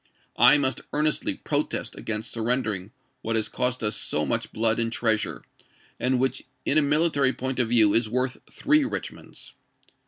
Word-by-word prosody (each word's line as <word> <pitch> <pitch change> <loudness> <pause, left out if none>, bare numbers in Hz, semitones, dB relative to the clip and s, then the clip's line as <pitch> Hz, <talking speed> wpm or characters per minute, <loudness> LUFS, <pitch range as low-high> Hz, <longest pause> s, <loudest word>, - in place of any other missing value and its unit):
I 150 - +8
must 135 -2 +1
earnestly 150 +1 0
protest - - -2
against 110 0 -3
surrendering 110 -5 -2 0.3
what 115 -1 -2
has 110 -1 +1
cost 125 -1 -2
us 105 - 0
so - - -1
much - - -2
blood 115 +1 +1
and 115 0 0
treasure, 110 -3 -1 0.6
and 130 +1 +1
which 130 +1 0 0.2
in 155 - +3
a - - +3
military 145 -2 +2
point 130 0 -4
of 120 -3 +1
view 110 -4 +5
is 115 -1 +3
worth 125 +2 -1
three 300 +1 +2
Rich 275 - -3
monds." - - -10
125 Hz, 165 wpm, -25 LUFS, 110-135 Hz, 0.6 s, I